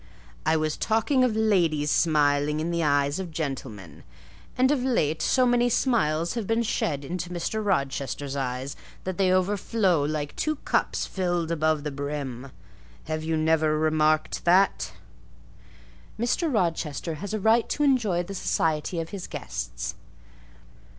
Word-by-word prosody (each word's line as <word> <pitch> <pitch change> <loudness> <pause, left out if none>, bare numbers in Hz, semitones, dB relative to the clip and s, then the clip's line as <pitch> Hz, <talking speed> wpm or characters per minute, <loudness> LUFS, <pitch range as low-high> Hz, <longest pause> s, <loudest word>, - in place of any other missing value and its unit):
"I 160 0 +4
was 155 -1 -1
talking 225 +4 +2
of 245 -4 +2
ladies 170 -9 +2
smiling 150 -2 +2
in 165 +2 -2
the 170 0 0
eyes 145 +1 +2
of 185 -2 -4
gentlemen; 135 - -6 0.5
and 260 +2 +4
of 285 -3 +1
late 160 - +1
so 255 -1 +3
many 245 0 +3
smiles 170 - +1
have 230 -5 -3
been 225 +1 +1
shed 145 -9 -1
into 175 +2 -4
Mr. 180 +5 -3
Rochester's 140 -5 -1
eyes 130 0 -3 0.3
that 185 0 -4
they 185 -1 +3
overflow 185 -1 +2
like 145 0 -3
two 310 0 0
cups - - 0
filled 175 -3 -1
above 155 -2 +1
the 150 - -3
brim: 140 -2 -5 0.5
have 155 0 -3
you 160 0 0
never 155 -1 +2
remarked 155 0 +1
that?" 185 +3 +3 1.3
"Mr. 290 +8 0
Rochester 165 - -1
has 205 - -5
a - - -2
right 225 +3 +3
to 295 - 0
enjoy 225 -11 +2
the 195 - -7
society 165 -2 0
of 165 0 -4
his 195 -3 -6
guests." - - -5
165 Hz, 145 wpm, -26 LUFS, 150-205 Hz, 1.3 s, I